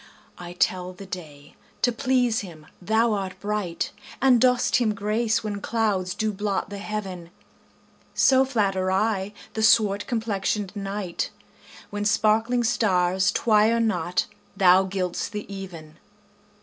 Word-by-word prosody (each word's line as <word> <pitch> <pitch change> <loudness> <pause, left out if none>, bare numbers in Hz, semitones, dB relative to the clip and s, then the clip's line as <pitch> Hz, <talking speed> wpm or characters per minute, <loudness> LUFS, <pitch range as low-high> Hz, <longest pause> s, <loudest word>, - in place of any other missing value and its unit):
I 175 0 -8
tell 180 0 0
the 195 +2 -11
day, 155 -6 -9 0.3
to 245 - +4
please 250 -2 +1
him 165 -6 -9 0.2
thou 220 +4 +2
art 190 -2 -4
bright, 205 -4 -2 0.3
And 255 -3 +4
dost 250 -1 +3
him 220 -4 +1
grace 215 +3 0
when 205 -2 -4
clouds 200 -6 -1
do 215 -1 -1
blot 200 0 -2
the 200 - -6
heaven: 195 -5 -5 0.9
So 265 0 +5
flatter 195 -7 0
I 195 0 0 0.2
the 220 - -2
swart 210 -2 +3
complexion'd 210 -3 -2
night, 195 -3 -3 0.6
When 205 0 -3
sparkling 225 +3 +2
stars 190 -4 +2
twire 220 +1 +3
not 180 -5 0 0.3
thou 190 0 +6
gild'st 185 -2 -3
the 210 - -4
even. 170 -5 -9
205 Hz, 130 wpm, -24 LUFS, 185-220 Hz, 0.9 s, thou